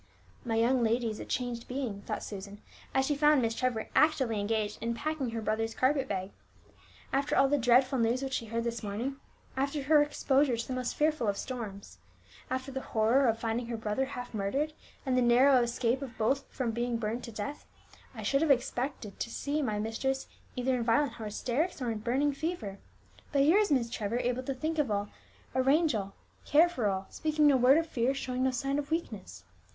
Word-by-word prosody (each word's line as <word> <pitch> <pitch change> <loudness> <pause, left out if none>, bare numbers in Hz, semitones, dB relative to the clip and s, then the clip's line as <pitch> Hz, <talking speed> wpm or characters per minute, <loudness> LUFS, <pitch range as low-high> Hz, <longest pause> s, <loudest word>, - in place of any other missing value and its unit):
"My 230 -2 -1
young 240 +2 +3
lady 230 0 +1
is 215 - -7
a - - -6
changed 245 -2 -3
being," 250 -6 -4
thought - - -4
Susan, 200 0 -7 0.3
as 265 0 +2
she 295 - +1
found 295 0 +4
Miss 230 -2 +1
Trevor 240 -2 -1
actively 265 -8 +3
engaged 210 0 -1
in 230 0 -1
packing 305 -1 -2
her 225 -1 -4
brother's 225 +1 -1
carpet 265 +1 +2
bag. 190 -2 -3 0.8
"After 275 +1 +1
all 275 - +6
the 290 +1 +2
dreadful 255 +2 +4
news 235 +3 +1
which 265 -1 -3
she 230 - -2
heard 230 +1 -2
this 235 0 -3
morning, 225 +7 -3 0.4
after 280 +2 -1
her 300 +2 +5
exposure 280 -3 +2
to 230 - -4
the 260 - -3
most 255 -1 -2
fearful 300 -6 +1
of 200 -1 0
storms, 215 -6 -6 0.5
after 260 +1 -3
the 265 0 -4
horror 235 +5 +2
of 225 -1 +2
finding 230 +1 -2
her 235 -1 -3
brother 220 +4 -1
half 250 -3 -7
murdered, 265 +10 -1 0.3
and 260 -1 +1
the 255 - +3
narrow 250 +2 +5
escape 240 +2 0
of 250 -5 -7
both 270 +5 +1
from 245 -3 -2
being 240 +1 -1
burned 230 +2 -3
to 230 - -8
death, 220 +7 -6 0.5
I - - -6
should 275 +1 +2
have 320 - +2
expected 250 -4 -1
to - - -2
have 230 - -10
seen 290 -1 -1
my 210 -2 -1
mistress 245 +5 -2 0.3
either 255 0 +1
in 240 - -1
violent 230 +2 +2
hysterics, 240 - -2
or 250 -3 -2
in 220 - -3
a - - -12
burning 270 +5 +1
fever! 275 - -4 0.5
But 275 -1 +3
here 330 +8 +5
is 420 -5 +1
Miss 255 -5 +3
Trevor 225 -1 -2
able 245 +1 0
to 270 +1 -3
think 315 +4 -2
of 285 -5 +1
all, 205 0 -1 0.4
arrange 275 +4 +3
all, 200 -2 -3 0.3
care 320 +4 +5
for 250 -11 -1
all, 190 0 -2
speaking 310 -1 +1
no 285 -2 +6
word 260 +3 +6
of 330 - +1
fear, 265 -3 0
showing 255 -2 -3
no 260 - +3
sign 275 +3 -1
of 285 0 -5
weakness! 325 +1 -4
250 Hz, 210 wpm, -30 LUFS, 225-275 Hz, 0.8 s, all